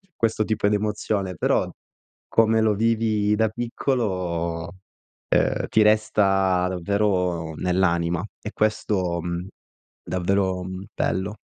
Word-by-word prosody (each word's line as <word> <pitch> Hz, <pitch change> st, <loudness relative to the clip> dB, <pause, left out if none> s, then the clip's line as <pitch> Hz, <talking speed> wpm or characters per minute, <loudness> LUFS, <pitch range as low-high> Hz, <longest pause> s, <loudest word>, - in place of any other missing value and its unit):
questo 110 Hz, -1 st, +1 dB
tipo 105 Hz, -2 st, +1 dB
d'emozione. 105 Hz, -2 st, -1 dB
Però, -, -, +1 dB, 0.6 s
come 110 Hz, 0 st, +3 dB
lo 110 Hz, -1 st, +3 dB
vivi 110 Hz, -1 st, +1 dB
da 110 Hz, 0 st, +2 dB
piccolo, 90 Hz, -, -2 dB, 0.5 s
ehm, -, -, +1 dB
ti 110 Hz, -, +3 dB
resta 95 Hz, -4 st, +3 dB
davvero 90 Hz, -3 st, 0 dB
nell'anima. 90 Hz, -1 st, +1 dB, 0.2 s
E 105 Hz, -, -6 dB
questo, 95 Hz, -5 st, 0 dB
mhmm, 85 Hz, +2 st, -4 dB, 0.6 s
davvero, 95 Hz, 0 st, 0 dB
mhmm, 95 Hz, +1 st, -6 dB
bello. 100 Hz, +3 st, -1 dB
100 Hz, 105 wpm, -24 LUFS, 90-110 Hz, 0.6 s, come